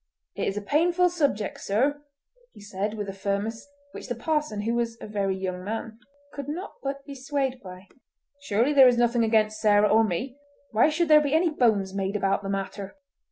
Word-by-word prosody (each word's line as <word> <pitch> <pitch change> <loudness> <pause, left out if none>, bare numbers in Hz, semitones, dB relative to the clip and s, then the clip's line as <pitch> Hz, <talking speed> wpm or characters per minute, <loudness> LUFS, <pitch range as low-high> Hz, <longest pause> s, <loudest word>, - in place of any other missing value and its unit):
"It - - -2
is 195 - -2
a 210 - -3
painful 345 - +2
subject, 285 - -1
sir," 275 +9 0 0.5
he - - -15
said 205 +1 -4
with 205 -2 -4
a 195 - -5
firmness 200 +5 -3 0.2
which - - -9
the 245 - -3
parson, 295 -4 -1
who 225 +3 -1
was 235 -1 -1
a - - -8
very 200 -2 -2
young 185 -1 -4
man, 220 +2 -5 0.3
could 285 -1 -6
not 355 +7 -5
but 275 0 -5
be 280 - -8
swayed 270 -1 -2
by. 185 0 -11 0.5
"Surely 240 +2 +1
there 270 -2 +8
is 245 -1 +3
nothing 240 0 +2
against 215 -1 +1
Sarah 210 -1 +4
or 225 +1 +5
me. 245 +7 -3 0.3
Why 225 +7 +4
should 335 +2 0
there 305 -1 +7
be 290 0 0
any 330 0 +3
bones 215 -9 +1
made 195 0 -2
about 195 -1 +1
the 195 - -6
matter?" 195 +2 -4
225 Hz, 200 wpm, -26 LUFS, 200-280 Hz, 0.5 s, there